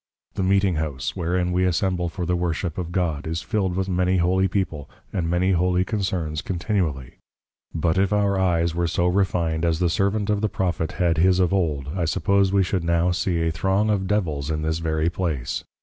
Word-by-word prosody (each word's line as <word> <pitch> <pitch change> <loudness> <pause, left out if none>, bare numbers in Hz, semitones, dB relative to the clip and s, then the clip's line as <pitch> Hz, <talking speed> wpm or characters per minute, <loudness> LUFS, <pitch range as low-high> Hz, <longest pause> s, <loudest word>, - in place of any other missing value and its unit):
The - - -3
Meeting 95 -2 +2
House 70 -4 -3
wherein 90 0 0
we 90 +1 +1
Assemble 90 0 0
for 90 0 -4
the 90 +1 0
Worship 85 0 -2
of 85 -1 -4
God, 85 -5 -1
is 80 +1 -3
fill'd 95 -4 -1
with 95 0 -1
many 90 0 +1
Holy 95 +2 +2
People, 90 -6 -3 0.2
and 85 -5 -1
many 90 +2 +2
Holy 90 0 +2
Concerns 90 -8 -2
continually; 85 - -2 0.5
but 85 +2 0
if 100 0 +2
our 100 -2 +2
Eyes 85 -3 +1
were 85 0 0
so 85 +1 0
refined 90 -3 +1
as 85 -2 +2
the 90 -1 +1
Servant 100 +3 0
of 105 -1 0
the 110 - +1
Prophet 85 -4 -2
had 85 -4 +1
his 90 +2 +4
of 90 0 +2
old, 75 -8 0
I 90 -3 0
suppose 100 +4 +2
we 100 -1 +3
should 90 -1 -1
now 85 +1 +2
see 90 -1 0
a 80 - +1
Throng 95 +6 +1
of 95 -2 0
Devils 80 -9 -1
in 75 -1 -2
this 80 +1 -1
very 80 0 0
place. 80 -9 -2
90 Hz, 200 wpm, -23 LUFS, 80-95 Hz, 0.5 s, his